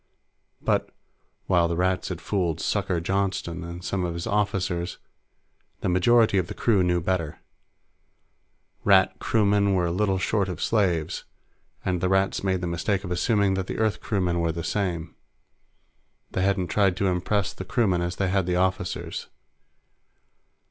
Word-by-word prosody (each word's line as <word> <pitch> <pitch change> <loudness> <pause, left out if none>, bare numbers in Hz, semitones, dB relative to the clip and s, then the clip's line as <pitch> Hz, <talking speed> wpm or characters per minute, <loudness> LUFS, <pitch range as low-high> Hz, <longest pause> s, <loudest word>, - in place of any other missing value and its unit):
But, - - +1 0.6
while 85 -2 +3
the 85 - -2
Rats 95 +1 0
had 90 -3 -5
fooled 90 -4 -1
"Sucker" 85 - 0
Johnston 95 -2 -1
and 85 +1 -7
some 95 -2 -1
of 85 -1 -2
his 85 - -4
officers, 95 -4 -1 0.8
the - - 0
majority 110 +3 +4
of 90 - -1
the 105 - -7
crew 105 -5 +2
knew 90 -1 +2
better. 85 -3 -1 1.5
Rat - - +4
crewmen 100 -2 +2
were 85 -2 +1
little 95 +1 +1
short 95 +1 0
of 90 - -5
slaves, 90 -8 0 0.6
and 90 -2 0
the 90 - +1
Rats 95 0 +1
made 95 -2 0
the - - -2
mistake 90 +3 -1
of 90 - -6
assuming 100 +2 +2
that 95 -1 -2
the - - -4
Earth 110 -2 0
crewmen 90 -5 0
were 85 -1 +1
the 85 +1 -5
same. 85 -5 -2 1.2
They 95 - -1
hadn't 95 -2 +1
tried 95 -2 +2
to 100 - 0
impress 95 +2 0
the - - -7
crewmen 95 -3 +1
as 90 +1 -2
they 95 -2 0
had 95 -1 +1
the 90 - +1
officers. 95 +1 -1
95 Hz, 155 wpm, -25 LUFS, 85-100 Hz, 1.5 s, majority